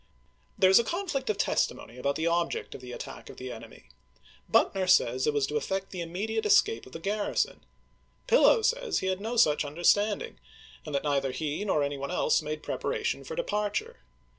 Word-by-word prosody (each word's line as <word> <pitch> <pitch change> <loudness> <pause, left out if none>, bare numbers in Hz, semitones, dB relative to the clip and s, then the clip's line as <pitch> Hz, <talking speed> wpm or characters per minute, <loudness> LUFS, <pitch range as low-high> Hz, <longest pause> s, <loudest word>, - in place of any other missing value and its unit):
There 185 0 +5
is 190 - +8
a - - +2
conflict 330 - -3
of 210 - 0
testimony 120 - -1
about 140 +2 0
the 160 - -2
object 170 0 -1
of - - -9
the 125 -1 -9
attack - - -8
of - - -11
the 130 0 -6
enemy. 115 - -12 0.6
Buck - - +4
ner 190 -1 -1
says 130 -7 +3
it 150 - +2
was 145 -1 +2
to 150 +2 -2
effect 195 +5 -3
the 185 - -5
immediate 210 +7 -3
escape 125 - +3
of 130 - -15
the - - -5
garrison; 205 +4 -1 0.6
Pillow - - +5
says - - +1
he - - -2
had 185 +1 -2
no 230 +3 -3
such 150 -8 +4
understand 175 - +2
ing, 465 - -10 0.5
and 150 - -3
that 140 - 0
neither 140 -2 0
he 150 +7 -3
nor 170 -8 +1
any 140 0 -3
one 140 0 -4
else - - +2
made 155 0 -5
prep - - -4
aration - - -2
for 475 - -7
departure. 210 - -2
175 Hz, 205 wpm, -28 LUFS, 145-215 Hz, 0.6 s, is